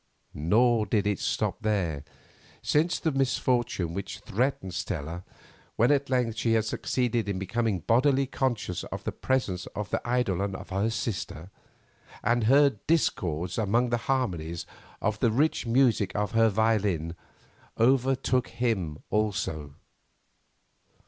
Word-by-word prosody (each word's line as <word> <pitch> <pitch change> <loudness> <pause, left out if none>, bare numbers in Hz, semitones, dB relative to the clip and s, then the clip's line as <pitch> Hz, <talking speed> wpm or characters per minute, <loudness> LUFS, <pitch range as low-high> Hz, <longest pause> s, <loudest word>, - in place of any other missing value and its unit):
Nor 110 +8 +3
did 100 0 +1
it 105 -2 0
stop - - -1
there, 90 -10 -1 0.6
since 160 +4 +2
the 160 - 0
misfortune 125 - 0
which 95 +1 -5
threatened 115 -5 -1
Stella 85 -1 -4 0.5
when 120 +5 +4
at 140 -1 +1
length 125 -4 0
she 115 - +2
had 110 -1 +2
succeeded 120 -1 -1
in 100 - -1
becoming 105 0 -1
bodily 135 - +3
conscious 120 -9 -2
of - - -6
the - - -2
presence 100 -9 -1
of 105 -2 -4
the - - 0
eidolon 100 -6 0
of - - -9
her 100 +3 0
sister, 100 -6 -4 0.7
and 120 0 +2
"heard 135 -2 +4
discords 90 - 0
among 115 +4 +1
the 120 - +2
harmonies" 85 -10 -1 0.4
of 105 0 0
the 120 - +3
rich 135 +2 +1
music 115 -5 +2
of 105 0 -1
her 115 0 +4
violin, 100 -6 +1 0.6
overtook 130 +1 +2
him 110 -10 -1
also. 80 -9 -1
110 Hz, 130 wpm, -27 LUFS, 95-125 Hz, 0.7 s, when